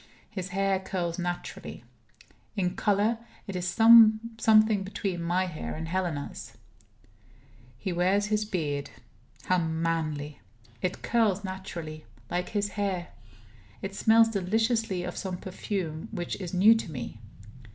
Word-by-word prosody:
His 190 -3 -5
hair 195 +1 +1
curls 180 -2 -3
naturally. 175 0 -5 0.7
In 180 -3 0
color, 210 +3 +2 0.3
it 195 - -6
is 180 0 -2
something 220 -1 +6
between 190 -2 -3
my 175 +2 +1
hair 170 -4 -5
and 160 +1 -5
Helena's. 170 -5 -3 1.2
He 180 +8 -3
wears 185 +4 +2
his 215 0 +1
beard. 150 -9 -2 0.5
How 185 0 +2
manly! 160 -3 -2 0.4
It 185 0 -2
curls 215 -4 +2
naturally, 170 -5 -6 0.3
like 180 +1 -1
his 205 -1 -1
hair; 195 -4 -2 0.7
it 195 0 -4
smells 225 +2 +5
deliciously 220 -1 0
of 180 0 -5
some 185 -2 -4
perfume 180 -4 -4
which 175 -1 -4
is 180 -2 -5
new 195 +5 +7
to 225 -7 -3
me. 120 -5 -6
185 Hz, 125 wpm, -28 LUFS, 175-210 Hz, 1.2 s, new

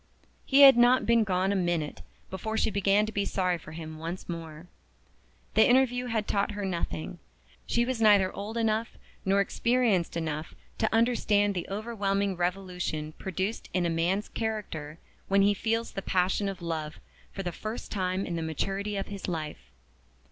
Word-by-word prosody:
He 275 +1 +5
had 270 -3 +10
not 245 +2 +5
been 230 -1 +4
gone 190 -1 +1
a - - +1
minute 175 -5 -1 0.3
before 220 +4 -3
she 220 - +1
began 200 +1 +3
to 215 - -5
be 205 -2 0
sorry 180 -3 0
for 155 - -11
him 155 -1 -7
once 170 +3 -6
more. 165 -1 -7 0.9
The 220 - +5
interview 250 -1 +3
had 220 -3 -1
taught 200 +1 0
her 205 -1 -3
nothing. 175 -2 -4 0.5
She 235 0 +2
was 250 -2 -2
neither 205 -3 +5
old 210 +3 -5
enough 225 0 0 0.3
nor 195 +1 +3
experienced 225 -5 +1
enough 155 -1 -4 0.2
to 220 - +1
understand 215 -3 +2
the 180 -3 -4
overwhelming 200 -2 -1
revolution 180 -4 -2
produced 190 +4 -3
in 180 -1 +2
a 170 - +1
man's 175 +5 0
character 195 -9 -4 0.3
when 195 0 +4
he 205 +1 +4
feels 225 +3 -1
the 195 - -4
passion 190 +2 +1
of 190 -3 -7
love 155 -2 -4 0.3
for 195 - -5
the 175 - -2
first 215 +6 -6
time 185 -1 -1
in 175 - -3
the 165 - -2
maturity 195 +6 -2
of 195 - -4
his 200 -1 -6
life. 155 - -5
195 Hz, 170 wpm, -28 LUFS, 175-220 Hz, 0.9 s, had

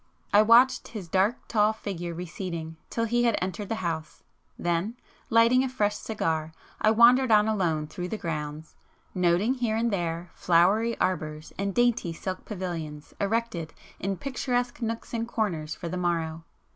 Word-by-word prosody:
I 205 - +8
watched 245 +4 +5
his 210 -6 -7
dark 195 +7 +1
tall 215 -1 +3
figure 180 -5 -5
receding 170 -2 -5
till 230 - -1
he 240 +1 +2
had 235 - +3
entered 190 +2 -4
the 225 - 0
house; 160 -2 -4 0.3
then, 175 +6 -1 0.3
lighting 230 +3 +5
a 265 - -1
fresh 210 -5 0
cigar, 160 -8 -2 0.3
I 215 - +5
wandered 240 +3 +6
on 210 0 +6
alone 170 -8 0
through 180 +3 -5
the 215 - -3
grounds, 155 -3 -5 0.4
noting 180 +6 +2
here 240 -4 -1
and 230 +1 +1
there 170 -2 -2
flowery 195 +7 +3
arbours 155 -4 -2
and 200 0 -2
dainty 240 -8 +2
silk 185 +2 -5
pavilions 165 -7 -5
erected 200 -6 -1 0.2
in 195 0 -2
picturesque 245 -1 -2
nooks 230 +1 -4
and 230 0 -1
corners 170 -10 -2
for 170 - -6
the 180 +2 -3
morrow. 165 -2 -1
195 Hz, 160 wpm, -27 LUFS, 170-230 Hz, 0.4 s, I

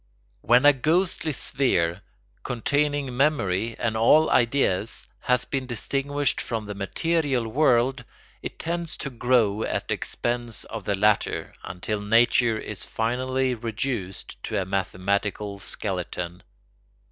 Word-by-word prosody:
] - - -39
When 125 +4 +4
a 145 - +9
ghostly 160 +4 +1
sphere, 100 - +1 0.4
containing 140 +2 0
memory 115 -7 +1
and 115 -2 -1
all 150 +8 +5
ideas, 115 -5 +1
has 125 0 +1
been 135 -2 -3
distinguished 140 +3 -1
from 115 -2 -3
the 105 - -5
material 135 - 0
world, 125 0 +2 0.4
it - - -6
tends 170 0 -3
to 140 - -5
grow 115 -4 +2
at - - -2
the - - +2
expense 120 -2 -2
of 110 -4 -7
the 100 - 0
latter, 105 +1 +1
until 100 +3 -4
nature 115 +2 +3
is 105 -2 -3
finally 130 +3 -1
reduced 110 -4 -4
to - - -1
a 95 - -2
mathematical 100 +2 -2
skeleton. 90 -3 -3
120 Hz, 125 wpm, -25 LUFS, 105-135 Hz, 0.4 s, a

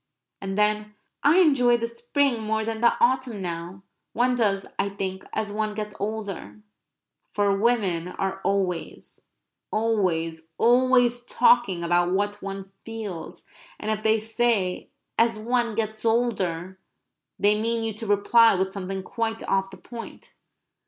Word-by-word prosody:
And 195 0 -4
then: 210 0 +1 0.3
"I 295 +5 +5
enjoy 250 -7 +4
the 230 0 -2
spring 240 +1 0
more 220 0 -1
than 225 0 -3
the 235 - +4
autumn 255 -3 +1
now. 175 +1 -6 0.3
One 250 +2 +2
does, 200 -5 +1
I 200 - +1
think, 190 -1 -4
as 215 -1 -2
one 215 0 -2
gets 210 -1 -4
older." 200 - -5 0.8
For 200 -1 +2
women 195 -6 +1
are 190 +1 -3
always, 185 -4 -2 0.5
always, 170 -8 0
always 245 0 +4
talking 195 -11 +3
about 175 +1 +2
what 205 +1 -1
one 195 0 -6
feels, 210 -8 -7 0.3
and 215 - -2
if 215 -1 -2
they 220 0 +3
say 220 -4 0 0.3
"as 230 -1 +3
one 235 0 0
gets 220 -1 -3
older," 190 -6 0 0.6
they 210 +1 +3
mean 230 0 -1
you 225 -1 -2
to 220 +1 -6
reply 205 +2 +5
with 190 +1 0
something 195 -1 -5
quite 225 +2 -3
off 195 0 +1
the - - -12
point. 235 -1 -10
215 Hz, 140 wpm, -25 LUFS, 195-230 Hz, 0.8 s, I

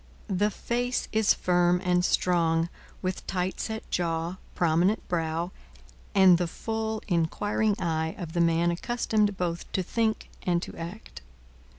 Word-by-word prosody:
The 205 +3 +2
face 245 +4 -2
is 220 -1 +4
firm 175 0 +3
and 180 0 +3
strong, 170 -2 +2 0.3
with 185 0 -3
tight 185 0 -2
set 220 0 -4
jaw, 170 +1 -1 0.2
prominent 175 +5 +2
brow, 165 0 -1 0.6
and 185 -3 +7
the 175 - 0
full, 220 +4 -3
inquiring 205 +4 +1
eye 160 +1 -1
of 170 -5 -6
the 175 - +2
man 170 +1 +3
accustomed 210 +1 0
both 175 -1 -3
to 185 - +1
think 220 +3 -1
and 175 -1 +1
to - - -7
act. 170 - -8
180 Hz, 135 wpm, -27 LUFS, 170-210 Hz, 0.6 s, and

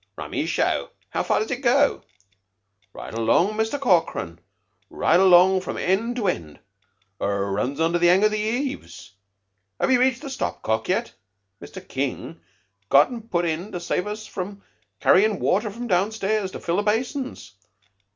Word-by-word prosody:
"Rummy - - -4
show. - - 0 0.2
How - - -1
far - - +1
does 435 - -3
it 250 0 -3
go?" 280 +3 +3 0.9
"Right - - -9
along, 115 - +2
Muster 220 +5 -1
Corkran 165 - 0 0.5
right 170 - +2
along 185 0 +6
from - - -5
end 220 +6 0
to 225 -5 -1
end. 80 - -3 0.6
Her 100 0 -1
runs 125 +9 -2
under 165 +2 +1
the 175 0 +4
'ang 185 +3 +4
of 215 - +4
the 215 - -1
heaves. 215 - -4 0.7
Have - - +1
'ee 255 - +5
rached 260 +2 +1
the 280 - -6
stopcock 110 - -2
yet? 230 +6 -1 0.5
Mr. - - -11
King - - -4 0.5
got 140 +1 +6
un 240 -2 -6
put 175 -5 0
in 170 +5 -3
to 180 - -3
save 180 +2 -2
us 215 +1 -6 0.7
carryin' 210 +1 +4
watter 210 +3 +1
from 235 +4 -7
down 195 0 +1
stairs 215 -2 -1
to - - -6
fill 170 +1 -1
the - - +2
basins. 245 - -2
195 Hz, 160 wpm, -23 LUFS, 170-230 Hz, 0.9 s, along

